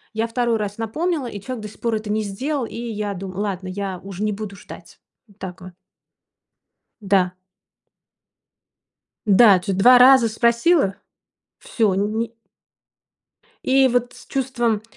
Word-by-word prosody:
Я 225 +1 0
2 235 0 0
раз 205 -1 -4
напомнила, 300 +7 -2
и 205 -4 -7
человек 250 -1 -6
до - - -5
сих - - -17
пор 230 -1 0
это 215 -1 -4
не 215 - 0
сделал, 255 +7 -3
и - - -10
я 215 -3 -4
думаю: 190 0 -7
"Ладно, 190 -3 -3
я 190 -1 -4
уж 195 -1 -9
не 210 0 0
буду 205 -1 -6
ждать". 200 - -13 0.3
Вот 205 -1 -24
так 185 -1 -8
вот. 185 -1 -11 1.3
Да. 190 -3 +1 1.9
Да, 205 -1 +6
дж 195 +2 -3
2 245 +7 +6
раза 255 -2 +7
спросила, 235 - +2 0.6
всё 225 - 0
ни 220 +4 -2 1.3
И 265 0 +4
вот 245 0 0
с - - -15
чувством 240 -5 -1
215 Hz, 145 wpm, -21 LUFS, 195-240 Hz, 1.9 s, раза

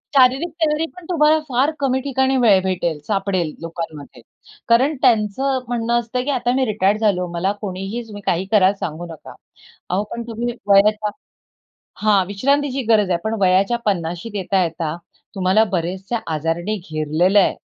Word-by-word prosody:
शारीरिक 265 +5 +4
तयारीपण 320 +3 -1
तुम्हाला 315 -2 +4
फार 265 +4 +2
कमी 265 -2 +1
ठिकाणी 265 0 0
वेळ 210 -6 +5
भेटेल, 170 -4 -1
सापडेल 195 -5 -1
लोकांमध्ये. 165 -3 -7 0.5
कारण 265 +6 +4
त्यांचं 245 +5 +2
म्हणणं 235 -1 -1
असतं, 250 +2 -3
की 290 - -4
आता 245 -2 0
मी 265 - +2
रिटायर्ड 210 -1 +1
झालो, 195 -5 +1
मला 185 +3 0
कोणीही 195 +3 -4
तुम्ही 205 -1 -9
काही 180 +2 0
कराल 200 -2 +5
सांगू 165 +2 -4
नका. 160 - -11 0.6
अहो, 190 +3 0
पण 235 - -4
तुम्ही 235 +1 -3
वयाच्या 210 +1 +4 1.0
हां, 205 -3 +4
विश्रांतीची 275 +6 0
गरज 210 -4 +3
आहे 170 - +2
पण 220 +1 -1
वयाच्या 190 +4 +3
50शीत 175 +2 -2
येता-येता 170 -4 -1 0.4
तुम्हाला 190 +3 +3
बरेचसे 185 +6 -2 0.2
आजारांनी 165 +7 -2
घेरलेलं 155 +6 +2
आहे. - - +2
205 Hz, 145 wpm, -20 LUFS, 185-245 Hz, 1.0 s, वेळ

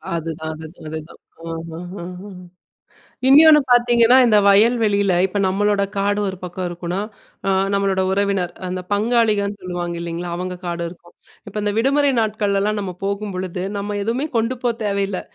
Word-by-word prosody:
அதுதான் 160 -1 -4
அதுதான் 160 +1 -11
அதுதான். 155 +1 -8 0.3
அஹஹஹ. 165 +3 -7 1.3
இன்யோன்னு 300 +2 +8
பார்த்தீங்கன்னா, 240 0 +5
இந்த 215 -3 +5
வயல் 215 +5 +5
வெளியில 200 -2 +2
இப்ப 195 +2 -4
நம்மளோட 200 +1 +1
காடு 205 +1 +1
ஒரு 190 - -5
பக்கம் 180 0 -4
இருக்குன்னா, 175 +2 -4 0.5
ஆ - - +3 0.2
நம்மளோட 195 -1 +1
உறவினர், 195 -2 0 0.2
அந்த 185 0 -3
பங்காளிகன்னு 210 -2 +1
சொல்லுவாங்க 175 -1 -4
இல்லேங்களா! 170 +1 -4
அவுங்க 180 0 -4
காடு 170 0 -3
இருக்கும். 175 0 -15 0.3
இப்ப 205 - -12
இந்த 205 0 0
விடுமுறை 280 +4 +3
நாட்கள்லலாம் 210 -1 0
நம்ம 190 -2 -4
போகும்பொழுது, 190 -3 -3 0.2
நம்ம 205 +1 -3
எதுவுமே 235 +7 -1
கொண்டு 230 +3 0
போ 240 - +3
தேவையில்ல. 200 -2 -1
200 Hz, 140 wpm, -20 LUFS, 180-215 Hz, 1.3 s, இன்யோன்னு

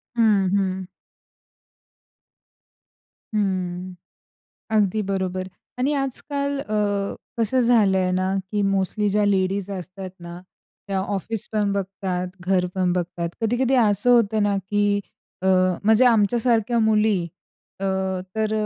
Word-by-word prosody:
हं, 210 -5 +3
हं. 190 -2 -1 2.5
हं, 185 -3 -2 0.8
अगदी 210 0 +2
बरोबर. 185 -1 -2 0.3
आणि 275 +4 +1
आजकाल 280 +1 -2
अ, 215 -5 -3 0.6
कसं 230 +3 +2
झालंय 200 -6 +3
ना 185 +1 0 0.2
की 205 -1 +1
मोस्टली 195 +2 0
ज्या 210 +1 +2
लेडीज 195 0 0
असतात 185 0 -7
ना, 170 +1 -9 0.5
त्या 195 -1 -1
ऑफिसपण 205 +1 -1
बघतात, 190 -2 -3 0.2
घरपण 180 -1 +1
बघतात. 175 -1 -2
कधी-कधी 245 +4 +1
असं 205 +2 +3
होतं 220 -3 +4
ना 205 -1 +1
की 205 0 +2 0.4
अ, - - -1 0.4
म्हणजे 220 +4 +5
आमच्यासारख्या 230 +1 +2
मुली 215 -3 +3 0.6
अ, 195 - -3 0.5
तर 220 0 0
200 Hz, 105 wpm, -23 LUFS, 185-220 Hz, 2.5 s, म्हणजे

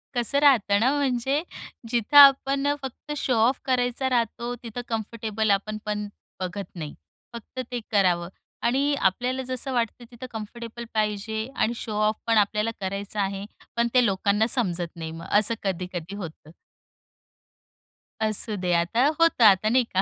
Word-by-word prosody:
कसं 245 +4 +1
राहतं 235 -8 +4
ना, 245 +5 +3
म्हणजे 270 +2 0 0.5
जिथं 240 +4 +1
आपण 275 0 +7 0.2
फक्त 265 +3 -8
शो-ऑफ 250 -1 +2
करायचा 250 0 0
राहतो, 240 0 -1
तिथं 235 +1 -6
कम्फर्टेबल 220 -1 -2
आपण 215 +2 0
पण 210 0 -2 0.3
बघत 185 +2 -4
नाही, 155 -4 -6 0.4
फक्त 235 +2 -9
ते 245 - -2
करावं. 180 -4 +2 0.3
आणि 275 +4 +2
आपल्याला 245 +7 0
जसं 255 +1 -3
वाटतं 240 0 -2
तिथं 240 +1 -9
कम्फर्टेबल 230 +1 -7
पाहिजे 215 +1 -1
आणि 230 - +1
शो-ऑफ 215 -1 -1
पण 230 -1 +3
आपल्याला 210 +2 +2
करायचा 200 +2 -3
आहे, 195 0 -3 0.3
पण 235 0 +3
ते 250 -1 +5
लोकांना 205 +2 +1
समजत 180 -9 0
नाही 160 -1 -6
मग 165 +1 -9
असं 215 +2 +3
कधी-कधी 180 -1 -4
होतं. 165 -5 -9 1.7
असू 215 0 +2
दे 180 -1 0
आता 175 +9 +2
होतं 330 -7 +4
आता 210 0 +6
नाही 250 +2 +4
का? 190 - +4
220 Hz, 145 wpm, -25 LUFS, 200-245 Hz, 1.7 s, आपण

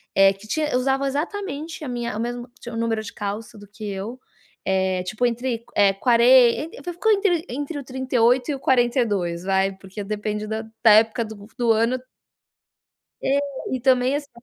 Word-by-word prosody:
eh, 195 0 +7
que 200 +3 -15
tinha 300 -1 0
usavam 270 +2 +1
exatamente 310 +1 -4
a - - -5
minha 240 -1 -3
tinha 210 - -5
o - - -1
mesmo 240 +1 -4 0.3
número 225 -1 -1
de - - -7
calça 210 +1 -5
do 205 - -13
que 210 +1 -10
eu, 200 +6 -5 0.5
eh, 190 -1 +1
tipo 215 +6 -1
entre, 240 -1 -1
eh, 200 -1 +5
quaren 245 +6 +5
e - - -11
ficou 440 +6 +1
entre 390 -5 +2
entre 290 +4 -4
o - - -7
38 255 0 +1
e - - -1
o - - -8
42 230 -10 +1
vai, 195 0 +1
porque 195 +2 -8
depende 210 0 -3
da 220 +1 -2 0.2
da 220 - +8
época 225 +1 -4
do 210 -1 -10
do 235 -2 +2
ano 230 +3 +1 1.3
É, 275 +1 +2 0.3
e 260 - -1
também 255 +1 +3
assim 290 -1 -4
235 Hz, 180 wpm, -23 LUFS, 210-265 Hz, 1.3 s, da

